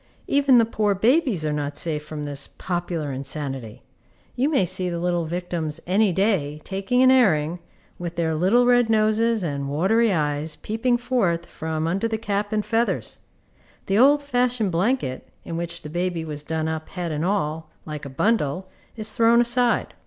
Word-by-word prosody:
Even 280 -2 +4
the 230 - +5
poor 210 -2 0
babies 225 - +2
are 150 - 0
not 145 -1 -3
safe 150 -2 -1
from 150 -1 -6
this 145 -1 -3
popular 175 -4 -4
insanity. 135 -4 -5 0.5
You 265 +4 +1
may 270 -12 +2
see 180 +1 0
the 170 - -3
little 175 -1 0
victims 170 -2 -3
any 195 +3 +3
day, 175 -6 0
taking 200 +6 0
an 260 - +7
airing, 175 - +3 0.4
with 175 -1 -5
their 165 -1 0
little 190 +10 +3
red 245 -1 +4
noses 220 0 +2
and 140 -4 -3
watery 205 +10 +2
eyes 150 -2 -1
peeping 240 +3 0
forth 230 -9 0
from 160 -1 -4
under 190 +7 0
the 225 -1 -2
cap 205 -1 -2
and 215 -1 0
feathers. 230 +1 -1 0.7
The 195 +2 +1
old 285 +3 +5
fashioned 245 -6 0
blanket, 175 - -1 0.2
in 165 - -5
which 170 0 -5
the 150 - -7
baby 175 -1 -2
was 150 -2 -5
done 160 0 -2
up 160 0 -4
head 175 -3 -4
and 150 +1 -2
all, 160 -4 -1 0.2
like 150 -1 -6
a 140 - -6
bundle, 185 - 0 0.3
is 215 -1 -5
thrown 230 +1 +4
aside. 240 0 +2
180 Hz, 175 wpm, -23 LUFS, 155-225 Hz, 0.7 s, an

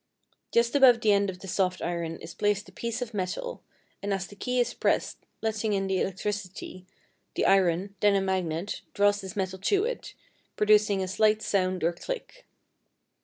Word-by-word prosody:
Just 235 +3 +2
above 260 -4 +7
the 220 -2 +3
end 200 0 +3
of 185 - -5
the 195 - -8
soft 185 0 0
iron 170 -1 -3
is 165 - -8
placed 205 -1 0
a - - -13
piece 235 +5 -3
of 235 -2 -10
metal, 205 - -3 0.4
and 200 - -3
as 195 -1 -1
the 205 - -13
key 250 +4 -1
is 245 - +1
pressed - - 0 0.2
letting 220 -1 0
in 195 -1 0
the 190 -1 0
electricity, 190 -1 -4 0.5
the - - +1
iron 190 0 +3
(then 205 -1 +4
a 195 - +3
magnet) 185 -1 -2
draws 205 0 +3
this 190 -2 -8
metal 190 -1 -2
to 395 - +2
it, - - -5 0.4
producing 210 -2 +4
a - - -3
slight 215 +3 +2
sound 185 -2 0
or 170 +1 +2
click. - - -7
200 Hz, 180 wpm, -28 LUFS, 185-215 Hz, 0.5 s, above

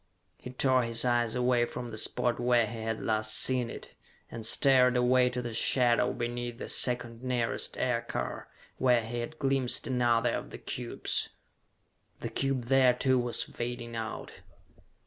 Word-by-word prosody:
He - - -9
tore 130 0 +2
his 115 0 0
eyes 120 -2 +1
away 125 -1 +2
from 120 0 -7
the 110 - -7
spot 120 -1 0
where 120 -1 +3
he 115 +1 -7
had 110 0 -3
last 110 -1 0
seen 125 -2 +2
it, - - -10 0.4
and 115 - -7
stared 125 +1 +4
away 125 0 +3
to 125 0 -4
the 120 -1 -5
shadow 120 +1 +2
beneath 120 0 -4
the - - -7
second 120 -2 +1
nearest 125 -2 -2
aircar, - - -3 0.3
where 125 -2 +3
he 120 +2 -5
had 135 +7 -6
glimpsed 135 -3 0
another 120 -2 +1
of - - -4
the - - -9
cubes. - - -1 0.9
The - - -5
cube 135 -2 -1
there, 130 0 +4
too, 130 0 +2
was 120 -1 -1
fading 120 -1 -6
out. 115 0 -6
120 Hz, 160 wpm, -29 LUFS, 115-125 Hz, 0.9 s, stared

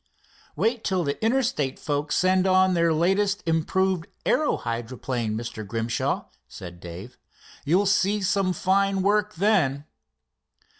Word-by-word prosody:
"Wait 230 0 0
till 185 -3 0
the 140 +6 -3
Interstate 225 - 0
folks 145 -1 -2
send 185 +1 +3
on 185 0 +4
their 170 -1 +2
latest 195 +5 +1
improved 170 +2 0 0.2
aero 305 - +2
hydroplane, 115 -1 -3
Mr. 115 -1 -6
Grimshaw," 115 +3 -2 0.2
said 85 -1 -10
Dave. 95 +9 -10 0.5
"You'll 180 +7 +3
see 200 +1 +2
some 195 -1 +1
fine 195 +2 +1
work 210 0 +1
then." 165 -8 +1
180 Hz, 120 wpm, -25 LUFS, 130-195 Hz, 0.5 s, on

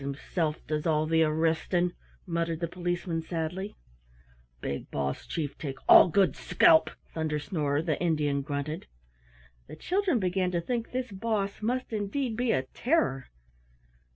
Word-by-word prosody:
"'Tis 140 - -5
himsilf 155 +1 -2
does 150 +1 -2
all 155 -1 +2
the 160 +1 +3
arristin'," 165 +3 +1 0.3
muttered 170 -2 -1
the 170 - -1
Policeman 175 -1 -2
sadly. 175 +5 -4 0.8
"Big 70 +2 -4
boss 70 -1 -3
chief 150 -4 -3
take 135 -4 -5
all - - +9
good 190 +2 +3
scalp," 165 -2 +5 0.2
Thunder 155 -2 -1
snorer, 150 -2 -1
the 160 -1 -1
Indian, 150 -5 +1
grunted. 145 +2 -4 0.8
The - - -9
children 365 - +1
began 185 -2 0
to 170 - +1
think 230 +5 -2
this 255 -2 -3
"Boss" 200 0 -2
must 245 +2 -2
indeed 220 +4 -1
be 245 0 +1
a 130 - +1
terror. 250 - +1
170 Hz, 145 wpm, -29 LUFS, 155-200 Hz, 0.8 s, all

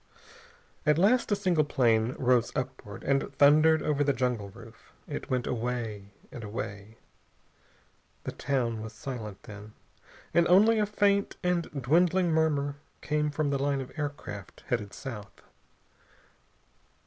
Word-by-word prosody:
At 150 -1 +3
last 220 +7 +3
a - - +4
single 180 -6 +2
plane 120 -4 +2
rose 125 -2 +2
upward 125 -6 -5
and 135 0 0
thundered 155 +3 +5
over 145 -1 +1
the 140 0 +2
jungle 125 -6 -1
roof. - - -15
It - - -6
went 125 -2 0
away, 115 -4 -3 0.2
and 120 - -8
away.... 105 0 -6 1.3
The - - -4
town 120 -5 -1
was 110 0 -7
silent, 110 -7 -7
then, 105 0 -11 0.6
and 170 0 +4
only 215 +5 +5
a 210 - +2
faint 200 -1 +1
and 180 -1 0
dwindling 170 +6 +3
murmur 145 -3 +1 0.2
came 150 0 0
from 145 0 -1
the 140 - 0
line 140 0 +1
of 130 0 -6
aircraft 145 - -6
headed 105 -5 -1
south. 110 -7 -8
135 Hz, 135 wpm, -29 LUFS, 115-160 Hz, 1.3 s, thundered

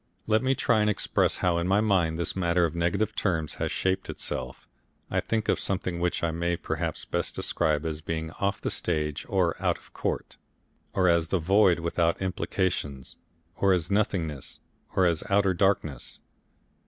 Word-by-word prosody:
Let 110 0 +3
me 130 +1 +2
try 115 -3 +2
and 105 - +3
express 105 - +1
how 85 -1 +3
in 85 - -1
my 100 +2 +4
mind 95 -7 +2
this 85 - 0
matter 85 -1 +2
of 80 - -2
negative 85 +6 0
terms 80 -6 -1
has - - 0
shaped 95 0 -1
itself. - - -5 0.4
I - - +2
think 110 -1 -1
of - - +2
something 90 -3 -1
which 90 0 -1
I 85 - +2
may 85 +1 -1
perhaps - - -3
best - - -2
describe 75 0 0
as 80 -1 -3
being 80 0 -3
off 100 +1 0
the - - -2
stage 75 -1 -1
or 90 -4 +2
out - - +1
of - - -21
court, - - -3 0.6
or 95 -1 +3
as 85 -2 +3
the 95 - +1
Void 95 +2 +4
without 85 0 +1
Implications, 90 -7 -2 0.4
or 95 -1 +3
as 85 0 0
Nothingness 90 -8 -1 0.4
or 95 - +4
as 85 -3 +1
Outer 100 -1 +3
Darkness. 85 -8 0
90 Hz, 175 wpm, -27 LUFS, 80-100 Hz, 0.6 s, my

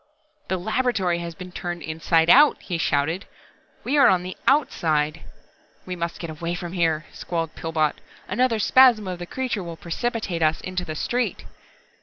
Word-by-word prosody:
"The 190 - -1
laboratory 195 -3 0
has 170 -1 -6
been 185 0 -9
turned 175 -1 -5
inside 160 +1 +1
out!" 285 - +6
he 175 -3 -4
shouted. 160 +5 0 0.6
"We 290 +3 +1
are 275 - +7
on 180 -2 +3
the 185 +1 -6
outside!" 165 - +1 0.6
"We 185 - -4
must 170 -1 -4
get 170 -2 -6
away 170 +2 -4
from 175 0 -6
here," 165 -3 +1
squalled 165 -2 -3
Pillbot. 160 -2 -1 0.3
"Another 250 -1 +1
spasm 230 -1 +5
of 180 -1 -4
the 175 - -6
creature 255 -4 -2
will 170 -1 -7
precipitate 190 0 -3
us 155 0 +2
into 185 -1 -3
the 155 - -5
street!" 245 +10 -2
175 Hz, 165 wpm, -24 LUFS, 165-215 Hz, 0.6 s, are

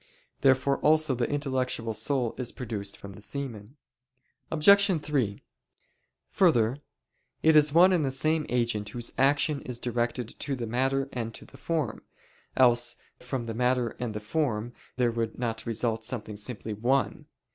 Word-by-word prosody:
Therefore 135 +1 +3
also 155 -2 +3
the 120 -1 -1
intellectual 130 -5 -1
soul 125 0 0
is 125 -2 -3
produced 105 -5 -5
from 100 -1 -10
the 100 - -13
semen. 120 -2 -6 0.7
Obj. 195 +3 +5
3: 135 -9 -2 0.9
Further, 125 - +3 0.7
it 160 0 +5
is 150 -1 +6
one 180 +4 +6
and 170 -4 +2
the 135 - 0
same 155 +4 0
agent 115 -4 0
whose 120 +2 -2
action 140 +1 +3
is 125 -2 -5
directed 120 0 -2
to 140 - -2
the 120 -2 -4
matter 135 +4 0
and 115 -2 -4
to - - -9
the - - -17
form: 145 -4 -2 0.5
else 120 -2 +4 0.2
from 125 -1 -4
the 115 - -4
matter 125 0 +1
and 115 -4 -3
the - - -2
form 120 -1 -2 0.2
there 125 -2 +2
would 115 -1 -3
not 115 -2 -3
result 115 0 0
something 110 -2 -4
simply 105 0 -4
one. 125 +6 0
125 Hz, 155 wpm, -28 LUFS, 115-140 Hz, 0.9 s, is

